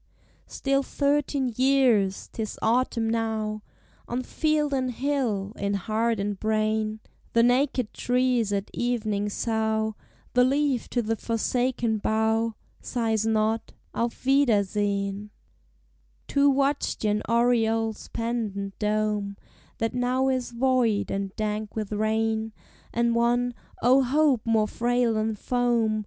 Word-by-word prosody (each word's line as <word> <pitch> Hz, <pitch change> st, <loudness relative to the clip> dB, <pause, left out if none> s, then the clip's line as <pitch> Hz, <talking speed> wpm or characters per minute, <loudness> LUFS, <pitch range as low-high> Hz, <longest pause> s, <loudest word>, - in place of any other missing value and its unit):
Still 275 Hz, 0 st, 0 dB
thirteen 280 Hz, -2 st, 0 dB
years: 250 Hz, -7 st, +3 dB
't -, -, -6 dB
is 215 Hz, -, -4 dB
autumn 230 Hz, 0 st, +1 dB
now 220 Hz, -2 st, -1 dB, 0.5 s
On 245 Hz, +2 st, -2 dB
field 305 Hz, 0 st, 0 dB
and 260 Hz, -1 st, 0 dB
hill, 245 Hz, -6 st, -1 dB
in 200 Hz, 0 st, -1 dB
heart 220 Hz, +3 st, 0 dB
and 200 Hz, -1 st, -2 dB
brain; 215 Hz, 0 st, 0 dB, 0.3 s
The 230 Hz, -, +5 dB
naked 250 Hz, -1 st, +2 dB
trees 250 Hz, -3 st, +1 dB
at 200 Hz, -1 st, -2 dB
evening 215 Hz, -4 st, -1 dB
sough; 220 Hz, 0 st, -1 dB, 0.4 s
The 250 Hz, -, +5 dB
leaf 275 Hz, -1 st, +1 dB
to 240 Hz, -, 0 dB
the 225 Hz, +1 st, 0 dB
forsaken 235 Hz, 0 st, -1 dB
bough 220 Hz, +1 st, +1 dB, 0.3 s
Sighs 225 Hz, -3 st, -1 dB
not, 220 Hz, 0 st, 0 dB, 0.2 s
"Auf 235 Hz, +2 st, -3 dB
wiedersehen!" 205 Hz, -6 st, +1 dB, 1.0 s
Two 280 Hz, 0 st, +3 dB
watched 275 Hz, -1 st, 0 dB
yon 210 Hz, 0 st, +1 dB
oriole's 225 Hz, -2 st, +1 dB
pendent 215 Hz, -4 st, -3 dB
dome, 210 Hz, -1 st, -1 dB, 0.4 s
That 225 Hz, +1 st, -1 dB
now 250 Hz, +2 st, +1 dB
is 255 Hz, -2 st, -1 dB
void, 240 Hz, -4 st, +1 dB
and 195 Hz, 0 st, -2 dB
dank 215 Hz, -1 st, -3 dB
with 215 Hz, -2 st, -3 dB
rain, 220 Hz, +1 st, 0 dB, 0.4 s
And 235 Hz, 0 st, +1 dB
one, 240 Hz, +1 st, +2 dB, 0.3 s
oh, 255 Hz, +3 st, +6 dB
hope 265 Hz, -2 st, +2 dB
more 220 Hz, -2 st, +3 dB
frail 240 Hz, +1 st, +1 dB
than 215 Hz, 0 st, -1 dB
foam! 235 Hz, -1 st, +1 dB
225 Hz, 120 wpm, -26 LUFS, 215-250 Hz, 1.0 s, oh